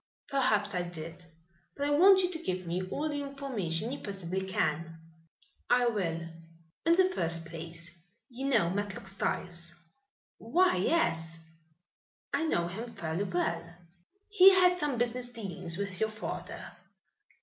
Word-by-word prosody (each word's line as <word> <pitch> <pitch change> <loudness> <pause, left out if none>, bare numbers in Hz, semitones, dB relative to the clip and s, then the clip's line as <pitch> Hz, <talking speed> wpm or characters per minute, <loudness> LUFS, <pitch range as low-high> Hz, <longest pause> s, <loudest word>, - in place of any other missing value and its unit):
"Perhaps 215 -7 +2
I 180 - 0
did. 170 0 -7 0.5
But 285 - -1
I 290 - +1
want 375 +5 +7
you 360 - +1
to 325 -2 -4
give 185 - -2
me 175 +2 -1
all 295 +9 -1
the 290 -1 -2
information 250 - -3
you 280 - -4
possibly 190 -2 -4
can." 165 -3 -1 0.7
"I 245 0 +5
will." 175 -7 -1 0.7
"In 335 - +6
the 375 +1 +4
first 165 - -1
place, 170 +1 -8 0.3
you 265 +1 -5
know 215 -11 +3
Matlock 205 0 -3
Styles." 175 -3 -3 0.6
"Why, 345 - +3
yes, 165 - +1 1.0
I 325 - +1
know 170 - +1
him 215 +7 -5
fairly 170 -3 -3
well." 170 -2 -2 0.5
"He 390 -2 +8
had 360 -1 +6
some 295 -7 -1
business 245 +1 -1
dealings 190 -7 -5
with 200 -2 -4
your 220 - +2
father." 215 0 -6
200 Hz, 140 wpm, -31 LUFS, 170-275 Hz, 1.0 s, He